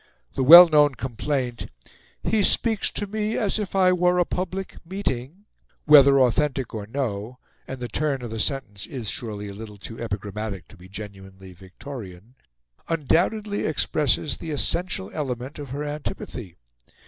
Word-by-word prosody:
The -, -, -2 dB
well 170 Hz, +6 st, +11 dB
known 150 Hz, -3 st, +4 dB
complaint 125 Hz, 0 st, -3 dB, 0.6 s
"He 220 Hz, -1 st, +2 dB
speaks 220 Hz, +2 st, +3 dB
to 205 Hz, -, -3 dB
me 215 Hz, +2 st, -2 dB
as 210 Hz, 0 st, 0 dB
if 205 Hz, -2 st, -5 dB
I 185 Hz, -1 st, +4 dB
were 180 Hz, 0 st, +2 dB
a 175 Hz, -, +3 dB
public 185 Hz, +2 st, -4 dB
meeting 175 Hz, -1 st, -4 dB, 0.2 s
" -, -, -36 dB
whether 140 Hz, -2 st, +7 dB
authentic 130 Hz, 0 st, +1 dB
or 105 Hz, -2 st, -5 dB
no 115 Hz, -2 st, -4 dB, 0.3 s
and 130 Hz, -, -6 dB
the 120 Hz, -, -4 dB
turn 135 Hz, +2 st, -2 dB
of 120 Hz, -, -6 dB
the 115 Hz, -, -5 dB
sentence 105 Hz, -6 st, -2 dB
is 120 Hz, -6 st, -4 dB
surely 105 Hz, -4 st, -5 dB
a 100 Hz, -, -7 dB
little 105 Hz, 0 st, -10 dB
too 115 Hz, +3 st, -10 dB
epigrammatic 105 Hz, -4 st, -5 dB
to -, -, -15 dB
be 90 Hz, +1 st, -15 dB
genuinely 95 Hz, -2 st, -10 dB
Victorian 95 Hz, +2 st, -11 dB, 0.6 s
undoubtedly 180 Hz, +7 st, 0 dB
expresses 150 Hz, -2 st, 0 dB
the 165 Hz, -, -8 dB
essential 155 Hz, -, 0 dB
element 130 Hz, -2 st, -5 dB
of 145 Hz, -2 st, -7 dB
her 140 Hz, +4 st, -4 dB
antipathy. 145 Hz, -, -6 dB
135 Hz, 155 wpm, -24 LUFS, 110-165 Hz, 0.6 s, well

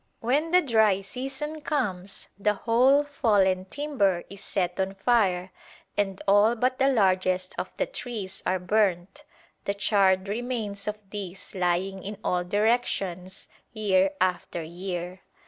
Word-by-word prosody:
When 280 Hz, +8 st, +1 dB
the 360 Hz, +1 st, +5 dB
dry 220 Hz, -6 st, +3 dB
season 270 Hz, +8 st, -5 dB
comes 200 Hz, -11 st, -3 dB
the 210 Hz, +1 st, +1 dB
whole 255 Hz, +7 st, +4 dB
fallen 205 Hz, -10 st, +2 dB
timber 200 Hz, -9 st, 0 dB
is 200 Hz, -, -8 dB
set 180 Hz, -1 st, -1 dB
on 190 Hz, +1 st, -1 dB
fire 195 Hz, -4 st, +2 dB, 0.4 s
and 195 Hz, -2 st, -1 dB
all 205 Hz, +4 st, +5 dB
but 255 Hz, +2 st, 0 dB
the 270 Hz, -, +4 dB
largest 185 Hz, -5 st, +2 dB
of -, -, -3 dB
the -, -, +1 dB
trees 220 Hz, -, -5 dB
are 185 Hz, -, +1 dB
burnt, 195 Hz, +5 st, 0 dB, 0.4 s
the 200 Hz, -, -1 dB
charred 195 Hz, -2 st, +3 dB
remains 215 Hz, -2 st, -3 dB
of 210 Hz, 0 st, -2 dB
these 195 Hz, -3 st, -7 dB
lying 185 Hz, +1 st, 0 dB
in 205 Hz, +2 st, -6 dB
all 180 Hz, 0 st, 0 dB
directions 195 Hz, -3 st, -1 dB, 0.3 s
year 195 Hz, -3 st, +3 dB
after 180 Hz, -2 st, -1 dB
year. 180 Hz, +2 st, -5 dB
200 Hz, 135 wpm, -26 LUFS, 185-240 Hz, 0.4 s, the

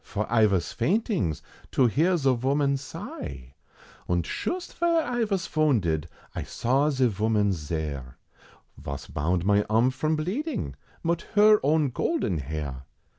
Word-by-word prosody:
for 105 Hz, 0 st, -3 dB
I 110 Hz, -2 st, +6 dB
vos 95 Hz, -4 st, 0 dB
faintings 170 Hz, -, 0 dB, 0.3 s
to 130 Hz, -, +4 dB
hear 165 Hz, +10 st, +3 dB
ze 135 Hz, -4 st, +3 dB
voman 140 Hz, +3 st, +1 dB
sigh! 70 Hz, -, -8 dB, 0.6 s
Und 85 Hz, -2 st, +1 dB
shust 355 Hz, -, -3 dB
vere 335 Hz, -1 st, +2 dB
I 240 Hz, -3 st, 0 dB
vas 195 Hz, -4 st, -1 dB
vounded, 100 Hz, -, +1 dB, 0.3 s
I -, -, -3 dB
saw 135 Hz, +5 st, +1 dB
ze 130 Hz, -3 st, +2 dB
voman's 105 Hz, -2 st, +1 dB
zere, 75 Hz, -5 st, -4 dB, 0.6 s
Vos 70 Hz, -1 st, -6 dB
bound 85 Hz, +4 st, -1 dB
mine 105 Hz, +1 st, +4 dB
arm 115 Hz, +4 st, +3 dB
from 155 Hz, +5 st, 0 dB
bleeding, 190 Hz, -, -2 dB, 0.3 s
mit 170 Hz, 0 st, 0 dB
her 210 Hz, 0 st, +7 dB
own 150 Hz, -1 st, +2 dB
golden 125 Hz, -, 0 dB
hair! 70 Hz, -2 st, -5 dB
120 Hz, 140 wpm, -26 LUFS, -, 0.6 s, her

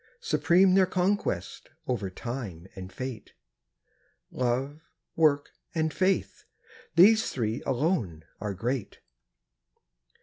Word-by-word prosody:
Supreme 190 Hz, -, +3 dB
their 190 Hz, -1 st, +5 dB
conquest, 180 Hz, -, -1 dB, 0.2 s
over 105 Hz, -7 st, -1 dB
Time 100 Hz, -5 st, -6 dB
and 95 Hz, -1 st, -8 dB
Fate. 130 Hz, -1 st, -7 dB, 1.0 s
Love, 130 Hz, +5 st, -1 dB, 0.3 s
Work, 150 Hz, -3 st, +3 dB, 0.2 s
and 160 Hz, -1 st, 0 dB
Faith—these 195 Hz, +2 st, +1 dB
three 115 Hz, -2 st, -2 dB
alone 125 Hz, -, -1 dB
are 105 Hz, -2 st, -4 dB
great. 115 Hz, +1 st, -3 dB
130 Hz, 90 wpm, -28 LUFS, 105-175 Hz, 1.0 s, their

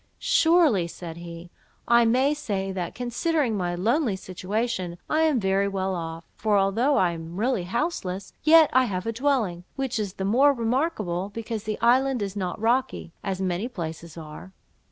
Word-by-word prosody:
—"Surely," 325 Hz, -, +3 dB
said 170 Hz, -1 st, -8 dB
he, 170 Hz, 0 st, -9 dB, 0.4 s
"I 235 Hz, 0 st, +5 dB
may 260 Hz, +5 st, +3 dB
say, 200 Hz, -10 st, -3 dB
that, 180 Hz, -3 st, -4 dB
considering 250 Hz, +1 st, 0 dB
my 175 Hz, -3 st, -1 dB
lonely 225 Hz, -, +1 dB
situation, 185 Hz, 0 st, -3 dB
I 310 Hz, -, +1 dB
am 300 Hz, -6 st, +2 dB
very 195 Hz, 0 st, +1 dB
well 190 Hz, -1 st, -2 dB
off; 165 Hz, -1 st, -5 dB
for 210 Hz, -2 st, +1 dB
although 225 Hz, +9 st, +2 dB
I 180 Hz, -2 st, +3 dB
am 165 Hz, +1 st, -7 dB
really 230 Hz, -5 st, 0 dB
houseless, 195 Hz, -, -3 dB
yet 315 Hz, 0 st, +6 dB
I 260 Hz, +1 st, +5 dB
have 185 Hz, -5 st, -3 dB
a 230 Hz, -, -2 dB
dwelling, 230 Hz, -9 st, 0 dB
which 265 Hz, -4 st, -2 dB
is 200 Hz, -3 st, -3 dB
the 190 Hz, -, -4 dB
more 265 Hz, +8 st, +4 dB
remarkable, 225 Hz, -, -1 dB
because 225 Hz, 0 st, -5 dB
the 215 Hz, -1 st, -3 dB
island 250 Hz, 0 st, +3 dB
is 200 Hz, 0 st, -5 dB
not 185 Hz, -3 st, -3 dB
rocky, 230 Hz, -6 st, 0 dB
as 190 Hz, -2 st, -3 dB
many 185 Hz, +4 st, -1 dB
places 170 Hz, -7 st, -7 dB
are. 160 Hz, +4 st, -10 dB
205 Hz, 170 wpm, -25 LUFS, 180-250 Hz, 0.4 s, yet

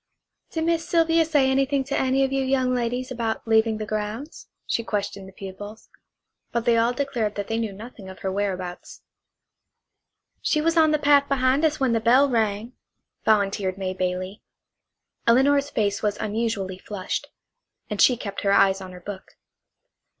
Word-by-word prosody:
"Did 320 Hz, -, -2 dB
Miss 330 Hz, 0 st, 0 dB
Sylvia 330 Hz, -1 st, +4 dB
say 295 Hz, -4 st, +3 dB
anything 270 Hz, +1 st, +1 dB
to 275 Hz, +1 st, -3 dB
any 265 Hz, +1 st, +2 dB
of 270 Hz, -, 0 dB
you 270 Hz, 0 st, +1 dB
young 260 Hz, -1 st, +1 dB
ladies 245 Hz, +1 st, -2 dB
about 230 Hz, -2 st, -3 dB
leaving 220 Hz, 0 st, +3 dB
the 215 Hz, -, -4 dB
grounds?" 215 Hz, +7 st, -5 dB, 0.2 s
she 230 Hz, -, -1 dB
questioned 200 Hz, -3 st, -3 dB
the -, -, -12 dB
pupils. 200 Hz, +3 st, -9 dB, 0.6 s
But 235 Hz, -1 st, -1 dB
they 235 Hz, -1 st, +4 dB
all 230 Hz, +1 st, +3 dB
declared 245 Hz, -5 st, -2 dB
that 205 Hz, -1 st, -4 dB
they 225 Hz, 0 st, 0 dB
knew 225 Hz, -3 st, -2 dB
nothing 205 Hz, -1 st, -10 dB
of 190 Hz, -, -10 dB
her 190 Hz, -3 st, -2 dB
whereabouts. 185 Hz, -3 st, -4 dB, 1.4 s
"She 305 Hz, -, +1 dB
was 330 Hz, +2 st, +1 dB
on 320 Hz, -1 st, +5 dB
the 305 Hz, -, +3 dB
path 285 Hz, -1 st, +4 dB
behind 265 Hz, +1 st, +2 dB
us 305 Hz, -1 st, +2 dB
when 260 Hz, -3 st, +2 dB
the 225 Hz, -, +2 dB
bell 250 Hz, +5 st, +5 dB
rang," 225 Hz, -1 st, -1 dB, 0.5 s
volunteered 200 Hz, -3 st, +1 dB
May 190 Hz, -1 st, -3 dB
Bailey. 185 Hz, +2 st, -3 dB, 0.9 s
Elinor's 280 Hz, +4 st, +4 dB
face 205 Hz, -2 st, 0 dB
was 210 Hz, -1 st, 0 dB
unusually 210 Hz, -4 st, -2 dB
flushed, 200 Hz, -2 st, -4 dB, 0.6 s
and 210 Hz, -2 st, -2 dB
she 250 Hz, -, +5 dB
kept 200 Hz, -3 st, -5 dB
her 200 Hz, -, +1 dB
eyes 195 Hz, -1 st, +4 dB
on 185 Hz, -1 st, -9 dB
her 180 Hz, -, -11 dB
book. 190 Hz, +1 st, -9 dB
225 Hz, 170 wpm, -24 LUFS, 200-270 Hz, 1.4 s, on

